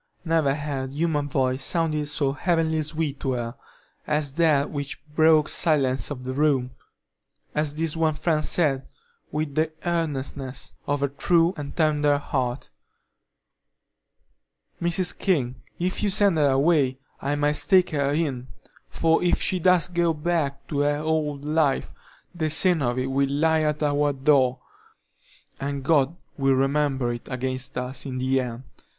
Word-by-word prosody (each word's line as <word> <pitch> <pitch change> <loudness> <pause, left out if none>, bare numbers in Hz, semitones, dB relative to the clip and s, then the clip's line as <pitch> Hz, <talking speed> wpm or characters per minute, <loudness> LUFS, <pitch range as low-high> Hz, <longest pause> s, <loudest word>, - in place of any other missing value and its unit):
Never 160 -4 +2
had 140 -3 -4
human 150 -2 -1
voice 130 -1 0
sounded 155 -2 0
so 145 -2 0
heavenly 160 +1 0
sweet 150 -2 -3
to 135 - -1
her 120 0 -4 0.5
as 150 -2 -1
that 155 -3 +2
which 140 -2 -4
broke 155 -1 +5
the - - -4
silence 135 -5 +1
of 130 -4 -6
the 130 0 -4
room, 135 -3 +1 0.8
as 150 -1 0
this 160 0 -1
one 160 -1 +1
friend 155 -1 0
said, 140 -7 +1 0.4
with 150 -1 -2
the 155 +2 0
earnestness 140 -5 -3
of 145 0 0
a - - +3
true 165 +5 +2
and 145 -2 -7
tender 150 -3 +3
heart: 130 -3 -3 2.1
"Mrs. 175 +1 +1
King, 135 -10 -1 0.2
if 180 +1 -2
you 205 - +1
send 200 -1 +3
her 145 -2 +4
away, 135 -1 +2 0.2
I 140 +2 -1
must 145 0 0
take 185 -2 +5
her 140 -2 0
in; 140 -5 -1 0.4
for 165 0 +2
if 175 - +2
she 185 - 0
does 180 0 +4
go 170 -2 +1
back 150 -3 -1
to 145 - -1
the 145 0 +2
old 150 -2 -2
life, 150 -2 +1 0.4
the 160 -3 -1
sin 170 +1 +3
of 120 -1 0
it 130 +1 -1
will 135 0 +1
lie 160 +3 +2
at 150 0 0
our 145 0 +1
door, 130 -2 +2 1.0
and 140 0 -3
God 145 +1 +2 0.2
will 135 -1 +3
remember 135 -2 +1
it 120 - -9
against 130 +1 -2
us 125 +3 -3
in 130 -1 -4
the 130 +1 +1
end. 120 0 -6
145 Hz, 155 wpm, -24 LUFS, 135-160 Hz, 2.1 s, broke